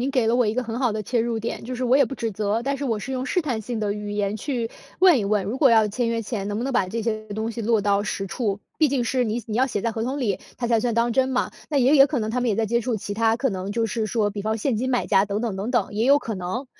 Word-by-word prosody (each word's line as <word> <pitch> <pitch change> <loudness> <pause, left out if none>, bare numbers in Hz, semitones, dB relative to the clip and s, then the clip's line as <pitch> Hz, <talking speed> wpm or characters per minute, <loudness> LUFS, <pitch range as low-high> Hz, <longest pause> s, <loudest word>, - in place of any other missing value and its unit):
您 265 +3 0
给 255 -5 +1
了 230 - +3
我 245 -1 +3
一 210 - +1
个 255 +2 -1
很 225 0 -4
好 250 -3 +2
的 215 - -3
切 230 +3 0
入 230 -1 -1
点。 230 +1 -4
就 250 +2 -5
是 255 - -2
我 250 +2 +4
也 280 - +5
不 240 - -8
指 230 -4 -2
责， 210 +2 -1
但 280 +1 0
是 280 - -4
我 225 -5 0
是 265 +5 -5
用 255 0 -2
试 360 - +1
探 250 -8 -2
性 230 +1 -4
的 205 -1 0
语 210 0 -5
言 205 0 -1
去 240 -2 -2 0.3
问 365 -5 +6
一 210 - 0
问， 205 -1 +1
如 220 +6 -3
果 270 -3 +5
要 220 -2 +5
签 230 +3 -1
约 230 0 0
前 210 -2 -4
能 205 +1 -2
不 240 - -2
能 270 - -2
把 185 - +1
这 230 +5 -3
些 215 -1 -2
东 220 +2 -3
西 230 - -5
落 225 -1 +2
到 200 0 +2
实 195 -2 -3
处， 200 0 -2 0.2
毕 310 - +4
竟 260 -3 0
是 255 +1 +1
你 230 +1 -1
你 215 0 -3
要 260 - +4
写 230 -6 -2
在 230 +1 -1
合 225 - -3
同 265 +4 -2
里， 210 -8 -1 0.2
它 240 - -2
才 230 -2 +2
算 240 0 0
当 235 +1 +1
真 260 +1 +2
嘛。 255 -1 -1 0.2
那 285 - +2
也 265 +4 +4
也 275 -1 +8
可 285 -2 -1
能 215 -1 -2
他 250 - 0
们 245 - +1
也 205 - 0
在 225 -1 +1
接 235 +2 +1
触 235 -1 -1
其 205 0 -5
他 225 +1 +2
可 265 +2 0
能 190 -1 -4
就 225 +1 0
是 220 +1 -2
说， 215 -1 +1
比 205 0 -5
方 220 +1 -1
现 245 +1 0
金 255 +4 -1
买 245 - +1
家 195 -1 +4
等 205 +1 -2
等 230 -5 -2
等 200 +5 -3
等， 245 - 0
也 220 +2 +1
有 280 +2 +6
可 225 -6 -5
能。 190 +9 -4
230 Hz, 360 characters per minute, -24 LUFS, 210-250 Hz, 0.3 s, 也